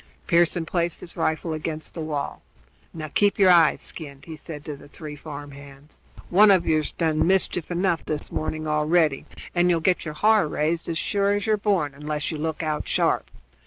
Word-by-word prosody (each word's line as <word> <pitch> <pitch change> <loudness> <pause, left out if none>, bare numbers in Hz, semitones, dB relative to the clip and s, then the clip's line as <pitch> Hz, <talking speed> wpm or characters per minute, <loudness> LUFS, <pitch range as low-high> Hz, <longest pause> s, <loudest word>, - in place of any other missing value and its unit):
Pearson 170 0 +2
placed 170 0 -1
his 175 - -10
rifle 160 0 -1
against 155 0 -5
the 165 - -5
wall. 150 -2 -4 0.5
"Now 155 -2 -6
keep 200 +6 +2
your 190 -2 +6
eyes 170 -2 +5
skinned," 140 -4 -7
he 160 - -8
said 150 -1 -9
to 150 - -5
the 140 - -14
three 150 0 -8
farm 145 -1 -8
hands. 140 +1 -13 0.3
"One 205 +4 +7
of 185 -3 +5
yer's 155 -2 +1
done 160 -1 +1
mischief 185 -3 +1
enough 175 -1 0
this 150 -1 -3
morning 155 0 -3
already, 150 -1 +2 0.3
and 175 0 +3
you'll 170 -2 +3
get 180 +2 +1
your 155 -2 -6
har 215 -1 +4
raised, 160 +3 -1
as 165 - -1
sure 200 +3 +1
as 205 - -2
you're 215 -1 +3
born, 195 -8 0
unless 150 +2 -3
you 155 - -5
look 160 +1 -3
out 155 -1 -2
sharp. - - +1
160 Hz, 195 wpm, -24 LUFS, 150-175 Hz, 0.5 s, One